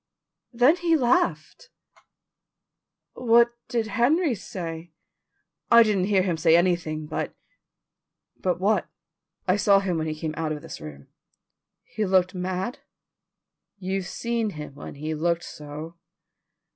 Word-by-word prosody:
"Then 250 Hz, +7 st, +4 dB
he 335 Hz, -2 st, +2 dB
laughed." 350 Hz, -, 0 dB, 1.4 s
"What 235 Hz, -1 st, +4 dB
did 235 Hz, -2 st, -1 dB
Henry 260 Hz, -, +2 dB
say." 170 Hz, -5 st, -7 dB, 0.8 s
"I 235 Hz, 0 st, +8 dB
didn't 205 Hz, -4 st, +1 dB
hear 195 Hz, -2 st, +3 dB
him 180 Hz, -3 st, -1 dB
say 165 Hz, +1 st, +5 dB
anything, 170 Hz, -3 st, 0 dB
but 150 Hz, -, -4 dB, 0.5 s
" -, -, -61 dB
"But 180 Hz, -2 st, 0 dB
what?" 205 Hz, +3 st, +1 dB, 0.6 s
"I 185 Hz, +2 st, +3 dB
saw 200 Hz, -1 st, +5 dB
him 185 Hz, -4 st, -1 dB
when 160 Hz, -, -2 dB
he 155 Hz, -, -3 dB
came 155 Hz, -1 st, -3 dB
out 155 Hz, -1 st, -2 dB
of 150 Hz, -, -7 dB
this -, -, -9 dB
room." 70 Hz, -2 st, -10 dB, 0.7 s
"He 215 Hz, -, -4 dB
looked 185 Hz, -1 st, +3 dB
mad?" 185 Hz, +5 st, -3 dB, 1.0 s
"You've 190 Hz, -1 st, -3 dB
seen 235 Hz, 0 st, -2 dB
him 150 Hz, -6 st, -8 dB
when 145 Hz, -, -9 dB
he 155 Hz, +2 st, -4 dB
looked 170 Hz, +2 st, 0 dB
so." 150 Hz, +3 st, -9 dB
185 Hz, 130 wpm, -25 LUFS, 165-230 Hz, 1.4 s, I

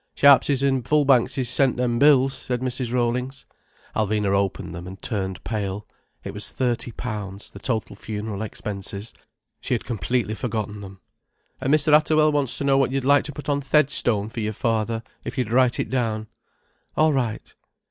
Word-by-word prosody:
"Sharpses 140 Hz, -1 st, +5 dB
and 135 Hz, -2 st, +2 dB
Fullbankses 135 Hz, -2 st, +3 dB
sent 125 Hz, +1 st, +2 dB
them 120 Hz, -1 st, 0 dB
bills," 135 Hz, -2 st, +5 dB
said 125 Hz, -2 st, -3 dB
Mrs. 125 Hz, -1 st, -2 dB
Rollings. 125 Hz, +2 st, -1 dB, 0.5 s
Alvina 105 Hz, -2 st, +1 dB
opened 100 Hz, -3 st, -1 dB
them, 85 Hz, +2 st, -7 dB
and 95 Hz, +1 st, -9 dB
turned 95 Hz, -5 st, -3 dB
pale. 105 Hz, -2 st, -3 dB, 0.4 s
It -, -, -6 dB
was 105 Hz, +1 st, -3 dB
thirty 120 Hz, -2 st, -1 dB
pounds, 105 Hz, -4 st, -6 dB
the 100 Hz, -, -11 dB
total 110 Hz, -3 st, -2 dB
funeral 105 Hz, 0 st, -5 dB
expenses. 100 Hz, -1 st, -5 dB, 0.5 s
She 125 Hz, -, -1 dB
had 115 Hz, -, -5 dB
completely 115 Hz, +1 st, -1 dB
forgotten 110 Hz, -3 st, -3 dB
them. 95 Hz, -1 st, -11 dB, 0.6 s
"And 135 Hz, -, 0 dB
Mr. 155 Hz, 0 st, +4 dB
Atterwell 155 Hz, 0 st, +5 dB
wants 145 Hz, -4 st, 0 dB
to -, -, -3 dB
know 135 Hz, -1 st, +3 dB
what 135 Hz, -2 st, +2 dB
you'd 135 Hz, -1 st, -1 dB
like 145 Hz, +2 st, +3 dB
put 145 Hz, +1 st, -9 dB
on 145 Hz, -1 st, +1 dB
th' 135 Hz, -, -16 dB
headstone 125 Hz, -8 st, +2 dB
for 115 Hz, -, -6 dB
your 110 Hz, 0 st, -2 dB
father—if 115 Hz, +2 st, -3 dB
you'd 125 Hz, -4 st, -1 dB
write 125 Hz, -1 st, +3 dB
it -, -, -2 dB
down." 115 Hz, -4 st, -1 dB, 0.7 s
"All 155 Hz, 0 st, +4 dB
right." 120 Hz, -5 st, -2 dB
120 Hz, 170 wpm, -23 LUFS, 105-135 Hz, 0.7 s, Sharpses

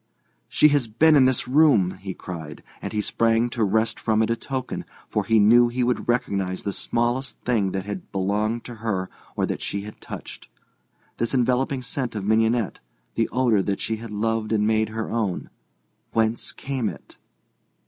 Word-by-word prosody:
"She 150 Hz, -, +5 dB
has 145 Hz, -5 st, +2 dB
been 155 Hz, +9 st, +4 dB
in 135 Hz, -3 st, +6 dB
this 130 Hz, -2 st, +1 dB
room," 130 Hz, -, +4 dB
he 95 Hz, -1 st, -5 dB
cried, 80 Hz, -5 st, -8 dB, 0.2 s
and -, -, -4 dB
he 105 Hz, -, 0 dB
sprang 115 Hz, +2 st, +1 dB
to 115 Hz, -2 st, 0 dB
wrest 110 Hz, +3 st, +1 dB
from 110 Hz, -1 st, +2 dB
it 110 Hz, -, 0 dB
a -, -, +2 dB
token, 130 Hz, +1 st, -4 dB, 0.2 s
for -, -, -1 dB
he 115 Hz, -1 st, +3 dB
knew 120 Hz, +3 st, +6 dB
he 125 Hz, +1 st, -1 dB
would 125 Hz, 0 st, -1 dB
recognize 100 Hz, -6 st, 0 dB
the 100 Hz, -, -2 dB
smallest 120 Hz, +6 st, -1 dB
thing 110 Hz, -6 st, +1 dB
that 95 Hz, -1 st, -3 dB
had 100 Hz, -2 st, -6 dB
belonged 105 Hz, +4 st, 0 dB
to 120 Hz, -, -8 dB
her 95 Hz, -5 st, -2 dB, 0.2 s
or -, -, +1 dB
that -, -, -4 dB
she 100 Hz, -, -3 dB
had 105 Hz, +1 st, -10 dB
touched. -, -, -9 dB, 0.7 s
This 115 Hz, +3 st, 0 dB
enveloping 130 Hz, +1 st, +1 dB
scent 125 Hz, -1 st, -3 dB
of 100 Hz, -2 st, -3 dB
mignonette, 110 Hz, +1 st, +2 dB, 0.3 s
the 115 Hz, -, 0 dB
odour 120 Hz, -5 st, +3 dB
that 100 Hz, +1 st, -2 dB
she 110 Hz, -, -2 dB
had 115 Hz, +1 st, -8 dB
loved 110 Hz, +1 st, -1 dB
and 105 Hz, -1 st, +2 dB
made 110 Hz, 0 st, +2 dB
her 110 Hz, 0 st, -4 dB
own—whence 110 Hz, -, -3 dB
came 130 Hz, -5 st, -2 dB
it? -, -, -12 dB
115 Hz, 180 wpm, -24 LUFS, 105-120 Hz, 0.7 s, in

